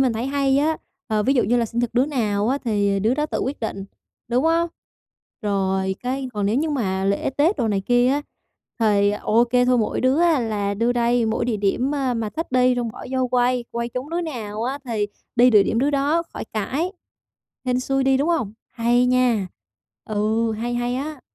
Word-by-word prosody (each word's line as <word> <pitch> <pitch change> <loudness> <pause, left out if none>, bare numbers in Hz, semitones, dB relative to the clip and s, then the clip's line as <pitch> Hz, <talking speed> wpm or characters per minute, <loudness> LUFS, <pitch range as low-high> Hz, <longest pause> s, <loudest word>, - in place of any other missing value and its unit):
mình 255 -3 +3
thấy 230 +4 -3
hay 275 -1 +2
á. 310 +2 +1 0.3
Ờ, 215 -2 +1
ví 270 +5 +2
dụ 245 - +3
như 245 - +2
là 235 -1 +1
sinh 235 +2 -2
thật 240 - -1
đứa 250 +3 +3
nào 215 -6 0
á 275 - +1
thì 200 -3 +1
đứa 225 +6 +2
đó 300 +1 -1
tự - - -3
quyết 270 +1 -3
định, 195 -3 -4 0.4
đúng 250 +4 +1
hông? 335 +1 +2 0.7
Rồi, 190 -2 0
cái 260 +1 -3
còn 205 -1 0
nếu 215 +4 +1
như 310 +2 0
mà 190 -8 -1
lễ 200 +6 0
Tết 295 +9 +2
đồ 230 - 0
này 200 -2 0
kia 245 +4 +3
á, 285 +2 +1 0.6
thì 205 -2 +3
ô 220 +3 +2
kê 245 +1 +2
thôi 250 -1 +3
mỗi 215 - -1
đứa 260 +5 +2
á 330 -6 +4
là 205 -3 -1
đưa 230 +4 +1
đây 240 -1 +2
mỗi 220 +1 0
địa 230 -3 0
điểm, 225 +8 0
a, 265 -3 0
mà 225 -2 -2
thích 320 -4 -5
đi 250 0 +4
xong 240 -2 -1
bỏ - - -9
vô 260 -1 0
quay, 250 0 +1
quay 235 0 -3
trúng 255 +5 -6
đứa 345 +1 -1
nào 225 -9 -5
á 265 +3 -2
thì 220 -4 -1 0.3
đi 245 +1 +6
địa 210 -3 +6
điểm 225 - 0
đứa 280 +4 +2
đó 290 +4 +1
khỏi - - -5
cãi, 275 - -2 0.7
hên 250 0 +1
xui 270 +1 0
đi 265 0 +4
đúng 285 +4 0
hông? 295 -12 0 0.2
Hay 240 +1 +2
nha, 245 -6 +2 0.6
ừ, 220 +2 0
hay, 235 +3 -3
hay 245 0 -1
á. 290 0 -5
245 Hz, 220 wpm, -22 LUFS, 215-270 Hz, 0.7 s, đi